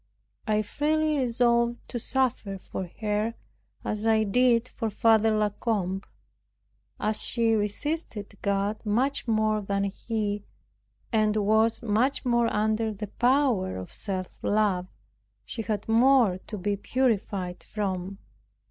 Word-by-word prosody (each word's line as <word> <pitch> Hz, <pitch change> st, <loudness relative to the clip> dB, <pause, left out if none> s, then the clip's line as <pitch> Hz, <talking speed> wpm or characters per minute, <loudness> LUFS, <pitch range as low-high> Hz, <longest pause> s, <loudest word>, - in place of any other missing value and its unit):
I 215 Hz, 0 st, +2 dB
freely 305 Hz, +6 st, +1 dB
resolved 235 Hz, -1 st, +2 dB
to 240 Hz, -, -3 dB
suffer 245 Hz, -6 st, -1 dB
for 185 Hz, -1 st, -6 dB
her, 215 Hz, +2 st, 0 dB, 0.5 s
as 215 Hz, +1 st, -1 dB
I 220 Hz, -1 st, +4 dB
did 235 Hz, +3 st, +3 dB
for 225 Hz, -3 st, -3 dB
Father 225 Hz, 0 st, +4 dB
La 210 Hz, -1 st, +2 dB
Combe. 195 Hz, -3 st, -2 dB, 1.0 s
As 215 Hz, 0 st, +1 dB
she 230 Hz, -1 st, +1 dB
resisted 210 Hz, -, -2 dB
God 200 Hz, +1 st, -1 dB
much 245 Hz, +6 st, 0 dB
more 215 Hz, -1 st, +2 dB
than 200 Hz, 0 st, -1 dB
he, 205 Hz, 0 st, -2 dB, 0.7 s
and 215 Hz, -1 st, +3 dB
was 220 Hz, +3 st, +2 dB
much 235 Hz, +6 st, +1 dB
more 235 Hz, -1 st, +2 dB
under 220 Hz, +1 st, +1 dB
the 210 Hz, -1 st, -6 dB
power 245 Hz, -, +2 dB
of 95 Hz, -, -8 dB
self 185 Hz, -3 st, -5 dB
love, 200 Hz, -4 st, +1 dB, 0.6 s
she 225 Hz, -, -5 dB
had 210 Hz, -2 st, -3 dB
more 230 Hz, -4 st, +4 dB
to 215 Hz, -, -5 dB
be 205 Hz, +2 st, -1 dB
purified 200 Hz, -6 st, -1 dB
from. 195 Hz, -2 st, -3 dB
215 Hz, 125 wpm, -27 LUFS, 205-235 Hz, 1.0 s, I